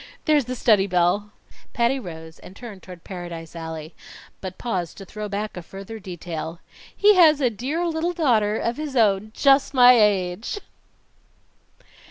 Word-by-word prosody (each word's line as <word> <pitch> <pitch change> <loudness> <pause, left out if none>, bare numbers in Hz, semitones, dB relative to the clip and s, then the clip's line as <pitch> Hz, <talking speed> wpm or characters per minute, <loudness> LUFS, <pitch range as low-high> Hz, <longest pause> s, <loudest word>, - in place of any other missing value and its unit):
There's 300 -4 +3
the 255 +1 -4
study 210 -5 +3
bell." 180 +3 +1 0.4
Patty 240 +3 +1
rose 160 -6 -10
and 185 - -13
turned 215 -6 -10
toward 180 -2 -12
Paradise 175 -3 -8
Alley, 160 -1 -7 0.5
but 185 -1 -7
paused 185 -8 -3
to 195 - -9
throw 210 +2 -7
back 205 +1 -4
a 180 - -6
further 195 +6 -9
detail: 170 -3 -6 0.4
"He 415 +1 +6
has 320 -6 +6
a 250 -4 +2
dear 275 - -2
little 335 +1 -1
daughter 225 -10 +2
of 235 +1 -2
his 300 -3 -5
own 210 -3 +2
just 275 0 +3
my 250 -1 +8
age!" 205 - +1
210 Hz, 155 wpm, -23 LUFS, 180-255 Hz, 0.5 s, my